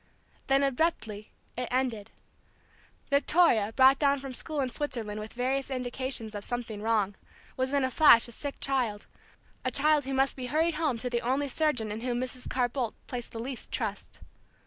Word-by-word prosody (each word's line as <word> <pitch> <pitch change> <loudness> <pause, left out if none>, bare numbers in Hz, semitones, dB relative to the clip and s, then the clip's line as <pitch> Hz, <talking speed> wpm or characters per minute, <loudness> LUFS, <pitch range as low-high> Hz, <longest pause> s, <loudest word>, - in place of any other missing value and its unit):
Then 275 +1 +3
abruptly 250 -7 -1 0.3
it 250 0 -3
ended. 240 -5 -1 1.0
Victoria, 280 -7 +4
brought 265 +3 +6
down 280 -1 +3
from 270 -1 -7
school 305 +4 -4
in 265 -2 0
Switzerland 230 -7 -3
with 215 +1 -8
various 265 +3 -1
indications 250 -3 -3
of 205 -1 -5
something 235 -3 -4
wrong, 215 -3 +1 0.4
was 260 0 -1
in 280 -1 +2
a 260 - 0
flash 255 -7 +7
a - - -10
sick 280 +4 -6
child; 245 -7 0 0.6
a 255 - +1
child 295 +1 +3
who 270 0 -2
must 270 +1 +2
be 255 -2 -5
hurried 320 +5 +1
home 305 -6 0
to 250 +2 -3
the 235 -1 0
only 270 +4 0
surgeon 260 -7 0
in 215 +2 -5
whom 245 -1 -1
Mrs. 255 0 -4
Carr 250 -1 +1
Boldt 240 -2 -3
placed 245 -2 -6
the 225 - -6
least 255 +1 -6
trust. - - -4
255 Hz, 180 wpm, -29 LUFS, 230-275 Hz, 1.0 s, flash